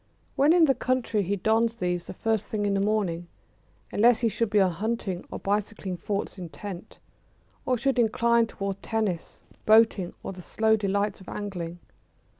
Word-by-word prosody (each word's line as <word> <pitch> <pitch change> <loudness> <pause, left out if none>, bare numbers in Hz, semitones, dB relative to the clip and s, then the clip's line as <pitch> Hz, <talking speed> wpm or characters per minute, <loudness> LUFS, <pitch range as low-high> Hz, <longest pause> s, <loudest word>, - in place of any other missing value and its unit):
When 285 +3 +4
in 340 -1 +6
the 270 - +4
country 255 -4 0
he 200 +1 -1
dons 225 +4 +1
these 180 -4 -2
the - - -7
first 220 0 -1
thing 210 -1 -2
in 200 - +1
the 195 - +1
morning, 195 -5 0 0.6
unless 235 +2 +4
he 230 - +3
should 230 +1 -1
be 210 - +3
on 190 -2 +4
hunting 195 0 -3
or - - -5
bicycling 205 -1 -2
thoughts 200 +2 -3
intent, 180 +1 -8 0.7
or 255 - +2
should 265 +1 0
incline 235 0 +3
towards 195 -2 -4
tennis, 215 -7 -3 0.2
boating, 215 -4 +4
or - - -5
the 180 - -10
slow 220 +4 +2
delights 200 -1 -1
of 190 - -11
angling. 175 -5 -5
210 Hz, 170 wpm, -27 LUFS, 190-225 Hz, 0.7 s, in